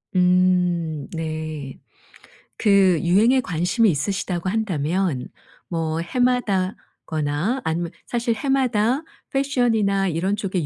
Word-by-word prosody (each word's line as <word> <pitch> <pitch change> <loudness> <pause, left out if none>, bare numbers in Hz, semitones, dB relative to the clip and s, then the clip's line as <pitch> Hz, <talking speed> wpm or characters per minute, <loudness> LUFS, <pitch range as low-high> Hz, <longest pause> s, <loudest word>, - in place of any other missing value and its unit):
음 180 -4 +2
네. 155 -4 -5 0.8
그 195 -5 +4
유행에 220 +9 +4
관심이 180 +4 +1
있으시다고 180 +3 -2
한다면 180 - -1 0.4
뭐 165 -2 -2
해마다거나 190 - -1
아니면 165 +1 -1 0.2
사실 235 -1 0
해마다 255 +1 +1 0.3
패션이나 230 -8 +1
이런 180 +5 0
쪽의 185 -5 -2
185 Hz, 220 characters per minute, -22 LUFS, 165-220 Hz, 0.8 s, 그